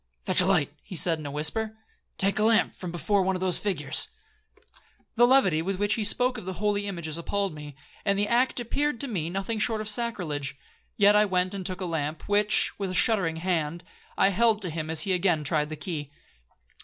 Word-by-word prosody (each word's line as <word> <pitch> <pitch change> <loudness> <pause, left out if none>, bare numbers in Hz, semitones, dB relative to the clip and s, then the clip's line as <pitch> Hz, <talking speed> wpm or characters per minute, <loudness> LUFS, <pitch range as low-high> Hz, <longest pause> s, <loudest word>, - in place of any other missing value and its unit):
'Fetch - - +5
a 180 - 0
light,' 160 -7 +1
he 185 - -9
said 165 -1 +1
in 150 - -7
a - - -5
whisper; 185 +10 0 0.4
'take 195 +2 +1
a - - +2
lamp 225 0 +3
from 180 -2 -7
before 175 +4 0
one 190 0 0
of - - -3
those 185 -2 +2
figures.' 155 -8 0 1.1
The 240 +1 +5
levity 195 -12 +3
with 190 +4 -2
which 205 +2 0
he 220 - -1
spoke 250 +3 +3
of 195 - -11
the 190 - -4
holy 205 +2 -1
images 170 -4 -4
appalled 195 +1 -2
me, 150 -2 -10 0.3
and 200 -1 +1
the 205 +1 0
act 250 +3 +1
appeared 280 +2 -2
to 280 - 0
me 175 -9 -3
nothing 195 +5 -3
short 220 0 +1
of 215 - -5
sacrilege; 180 - -1 0.4
yet 205 0 +5
I 210 0 +5
went 185 -1 0
and 195 -1 -4
took 185 +1 -4
a - - -2
lamp, 155 -2 -4
which, 205 +1 +4
with 195 -2 -2
a 185 - -4
shuddering 180 -6 +2
hand, 170 -1 -2 0.3
I - - +4
held 220 +1 +2
to 180 - -1
him 155 -1 -5
as 160 -1 +1
he 190 +3 +1
again 175 -4 +1
tried 150 0 0
the 155 - -5
key. 150 -2 -5
190 Hz, 215 wpm, -26 LUFS, 160-210 Hz, 1.1 s, Fetch